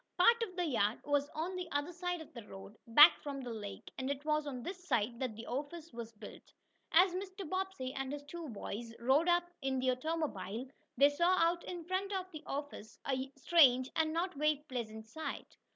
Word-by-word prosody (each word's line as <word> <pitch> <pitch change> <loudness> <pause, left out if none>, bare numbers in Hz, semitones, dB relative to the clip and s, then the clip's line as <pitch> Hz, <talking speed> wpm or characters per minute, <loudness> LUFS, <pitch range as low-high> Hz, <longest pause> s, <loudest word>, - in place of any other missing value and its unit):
Part 465 +6 +6
of 395 -6 -3
the 355 -1 0
yard 225 -7 +1
was 290 0 +1
on 335 +4 -2
the 360 -2 -4
other 290 +5 -1
side 355 0 -2
of 320 - -12
the 235 -3 -8
road, 195 +2 -10
back 295 +8 +9
from 280 -2 -5
the 245 -2 -5
lake, 205 -3 -7
and 260 +1 -2
it 280 +1 -3
was 305 -1 +1
on 255 -4 -5
this 360 +3 -6
side 235 - +1
that 255 -5 -2
the 225 +2 -8
office 295 +5 -5
was 230 -1 -6
built. 210 - -12 0.4
As 360 +2 +6
Mr. 380 0 -5
Bobbsey 375 -7 -3
and 270 -1 -3
his 290 0 -5
two 325 +1 -7
boys 230 +1 -6
rode 270 +8 +3
up 350 0 +3
in 265 -1 0
the 255 0 +2
automobile, 255 - -2 0.3
they 280 +3 +7
saw 345 +5 +3
out 340 0 +2
in 350 -2 -5
front 375 +3 -1
of 370 -1 -3
the 310 - -8
office 280 -7 -5
a 265 0 -1
strange 265 -4 +5
and 315 -1 +2
not 345 +3 -1
very 300 0 +1
pleasant 220 -4 -5
sight. 310 +8 -6
290 Hz, 205 wpm, -34 LUFS, 250-345 Hz, 0.4 s, back